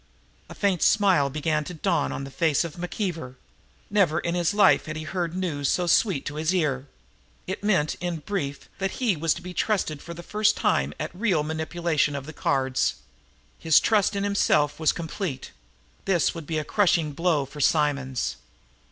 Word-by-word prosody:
A - - -9
faint 195 -4 +1
smile 190 -9 +4
began 150 +2 -1
to 180 - -7
dawn 165 -2 0
on 135 - -4
the 135 - -8
face 160 0 +2
of 170 -3 -6
McKeever. 175 - -4 0.6
Never 180 -6 +3
in 170 - -2
his 175 -2 +1
life 205 -5 +4
had 155 - -4
he 155 - -5
heard 175 0 -3
news 155 -7 -1
so 180 - +1
sweet 175 -3 +2
to 145 - -5
his 160 +4 0
ear. 145 -6 0 0.6
It 190 +2 -5
meant, 185 -8 +2
in 175 -2 -2
brief, 150 -4 -4
that 195 0 -1
he 235 -7 +1
was 160 0 +1
to - - -9
be 180 0 -7
trusted 175 -7 -1
for 170 - -8
the 175 - -9
first 210 +3 +1
time 70 +2 +1
at - - -4
real 180 -5 +1
manipulation 160 -1 -1
of 140 -1 -5
the 155 - -8
cards. 135 -3 0 0.6
His 160 -2 +5
trust 210 -2 +2
in 200 - -1
himself 150 -8 +2
was 160 - +3
complete. 165 -4 -5 0.5
This 185 -5 +2
would 165 -4 -8
be 160 - -2
a 155 - -1
crushing 170 -3 +2
blow 160 -2 +1
for 145 +2 -8
Simonds. 140 -4 +1
165 Hz, 185 wpm, -25 LUFS, 150-185 Hz, 0.6 s, His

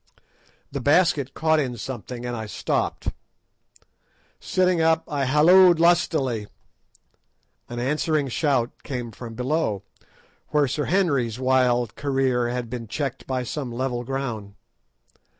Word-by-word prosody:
The 140 -1 -4
basket 145 -2 +2
caught 160 0 +2
in 125 -4 -2
something 125 0 -6
and 120 0 -3
I 110 -1 -5
stopped. 105 - -2 1.3
Sitting 185 -2 +1
up 160 0 +3
I 145 -3 -1
halloed 170 +5 +6
lustily. 145 -10 +2 1.2
An 120 - -6
answering 150 +3 0
shout 130 -2 +1
came 125 -4 -5
from 115 +1 -9
below, 125 - -1 0.6
where 150 -2 +2
Sir 145 +3 -2
Henry's 140 - +1
wild 125 -3 +2
career 135 -4 0
had 125 -1 -3
been 115 -1 -6
checked 135 +4 -4
by 130 -1 -1
some 130 +1 -4
level 120 0 -2
ground. 120 -6 -4
130 Hz, 120 wpm, -24 LUFS, 120-150 Hz, 1.3 s, halloed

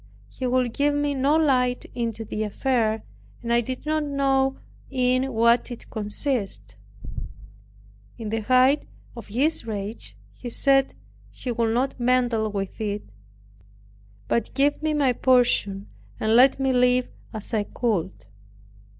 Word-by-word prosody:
He 255 - -3
would 250 -2 +1
give 290 +2 +1
me 290 0 0
no 275 +2 +2
light 250 -5 +2
into 230 -2 -3
the 215 - -4
affair, 220 0 0 0.4
and 235 0 0
I 235 - +4
did 255 +4 -5
not 310 0 0
know 270 -2 +1 0.3
in 255 0 +1
what 235 +1 +3
it 240 - -10
consisted. 215 +1 -3 1.4
In 225 -3 -5
the 225 +1 -1
height 255 +5 +3 0.3
of 235 -3 -9
his 265 +5 +1
rage, 210 0 -5 0.2
he 245 - -8
said 270 +2 +2 0.3
he 250 - -5
would 230 -1 0
not 260 +1 -1
meddle 240 -3 +2
with 195 +1 -4
it, 205 -1 -2 1.2
but 235 +1 -1
give 285 +2 +2
me 310 -1 0
my 275 -4 +3
portion, 240 -6 +2 0.3
and 220 +1 +2
let 260 +3 +6
me 270 -1 +1
live 250 0 +3 0.2
as 215 0 -8
I 210 -2 +1
could. 200 - -2
250 Hz, 140 wpm, -24 LUFS, 225-270 Hz, 1.4 s, let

